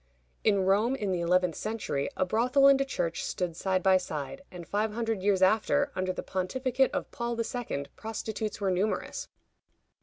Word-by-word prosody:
In 200 -3 +3
Rome, 210 +7 +3
in 205 -7 -2
the 180 - 0
eleventh 180 0 +2
century, 205 -9 -2
a - - +2
brothel 250 +8 +3
and 275 0 +7
a - - +1
church 175 -10 -2
stood 175 -3 -2
side 185 +1 0
by 190 -1 +6
side, 170 - -5
and 175 -2 -9
five 210 +1 0
hundred 225 -3 -1
years 195 -1 +3
after, 225 +9 +3
under 185 0 0
the 180 - -5
pontificate 255 +8 0
of 285 - -3
Paul 235 -1 -3
II., 230 - -3
prostitutes 220 -1 -4
were 195 -2 +1
numerous. 195 +4 -1
205 Hz, 175 wpm, -29 LUFS, 185-235 Hz, -, and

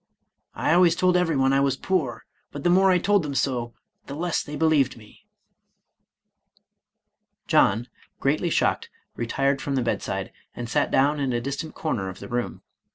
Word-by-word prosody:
I - - +1
always 175 -1 +5
told 180 0 +2
everyone 150 -7 +2
I 135 - +4
was 140 -1 +1
poor, 165 -9 -2 0.3
but 145 - -7
the 175 - +3
more 190 +2 +5
I 185 - +5
told 205 +2 +2
them 145 -3 -5
so, 120 -4 -1 0.3
the 140 - -6
less 170 +2 -1
they 150 - -7
be 160 - +1
lieved 145 -6 +2
me." 105 -2 -18 2.2
John, 110 +5 +3 0.3
greatly 155 +5 +1
shocked, - - 0 0.3
retired 135 +4 0
from 140 - -2
the 130 - +1
bedside, 120 - -3 0.2
and 120 - -5
sat - - +1
down 145 +3 +2
in 135 -3 -1
a 120 - 0
distant 140 +5 -5
corner 105 -12 -2
of 95 - -9
the - - -9
room. 120 0 -4
140 Hz, 170 wpm, -24 LUFS, 125-165 Hz, 2.2 s, always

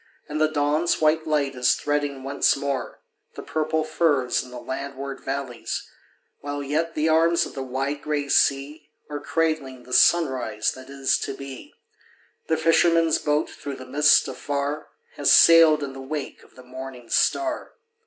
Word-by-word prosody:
nd 150 +1 -3
the 155 - +5
dawn's 155 +2 0
white 155 +1 +2
light 145 -3 0
is 125 -1 +2
threading 145 -2 -2
once 140 +1 +2
more 140 -5 -4 0.3
The - - -8
purple 155 0 -1
firs 155 -5 +1
in 125 - -13
the 125 - -9
landward 140 +1 -6
valleys, 135 -3 -5 0.5
While 145 0 -5
yet 160 +4 -2
the 155 +1 +1
arms 165 +1 +3
of - - -10
the 135 - -5
wide 135 +3 -3
gray 150 -2 -2
sea 145 +2 +1 0.2
Are 145 - -3
cradling 145 -5 -2
the 125 - -9
sunrise 130 -7 +2
that 130 0 -12
is 140 -1 0
to 135 - -4
be. 135 -2 -10 0.7
The 160 - +1
fisherman's 165 0 +3
boat, 150 0 0
through 140 -1 -7
the 130 - -10
mist 145 +4 +4
afar, 145 +1 -3 0.3
Has - - +3
sailed 165 -3 +7
in 135 -1 -5
the 135 - -9
wake 145 +1 -6
of - - -22
the 130 - -14
morning 130 -1 -9
star. 325 -3 0
145 Hz, 165 wpm, -24 LUFS, 135-155 Hz, 0.7 s, sailed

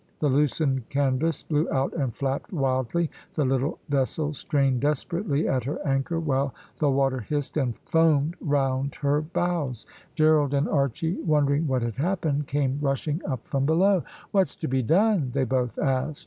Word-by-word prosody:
The 150 - +1
loosened 135 -2 +1
canvas 140 +3 0
blew 150 0 0
out 135 0 0
and 135 -6 -1
flapped 135 - -3
wildly 135 - 0 0.2
the 150 - +1
little 135 +4 0
vessel 145 +2 0
strained 135 -3 +1
desperately 150 +2 0
at 130 -3 0
her 140 - -2
anchor, 140 +4 0
while 140 -4 0 0.2
the 150 - +3
water 135 -1 +1
hissed 145 +5 -3
and 130 -6 0
foamed 160 -1 +3
round 135 -2 0
her 145 +1 +1
bows. 155 -6 -2 0.3
Gerald 155 -3 +3
and 140 +3 +1
Archy 145 +4 0
wondering 150 -1 +2
what 130 -3 0
had 115 -2 -3
happened, 150 -3 0
came 140 -1 0
rushing 145 +3 -1
up 130 -5 -3
from 135 0 0
below. 185 +3 +3 0.3
"What's 195 -2 +2
to 160 - -4
be 130 0 +1
done?" 175 - +2
they 135 - +1
both 125 -2 -1
asked. 135 +1 0
140 Hz, 160 wpm, -26 LUFS, 135-155 Hz, 0.3 s, the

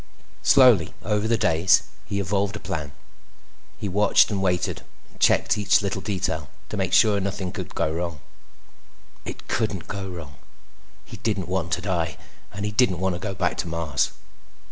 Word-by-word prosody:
Slowly, 125 - +5
over 105 +1 0
the 115 0 +2
days, 90 -2 +4 0.2
he 100 -1 -2
evolved 100 +1 0
a - - -5
plan. 80 -9 -4 0.9
He 105 - -4
watched 105 +3 +4
and 100 -2 -1
waited 90 -2 0 0.3
and - - -23
checked - - +3
each 105 +1 +3
little 95 -1 -2
detail 100 -3 -2 0.2
to - - -4
make - - -1
sure 105 -2 +5
nothing 95 -1 -3
would - - -6
go 80 - 0
wrong. 85 -2 -3 1.1
It - - -8
couldn't 100 -6 -2
go 100 -1 -5
wrong. 80 -5 -9 0.7
He 110 - -10
didn't 100 -4 -2
want 90 -2 -1
to 90 - 0
die, 85 -4 -1 0.3
and 100 +2 -4
he 105 - -2
didn't 105 -4 +3
want 95 +1 0
to 85 - -4
go 100 +1 -4
back - - 0
to - - -2
Mars. 80 -4 0
95 Hz, 170 wpm, -24 LUFS, 85-105 Hz, 1.1 s, Slowly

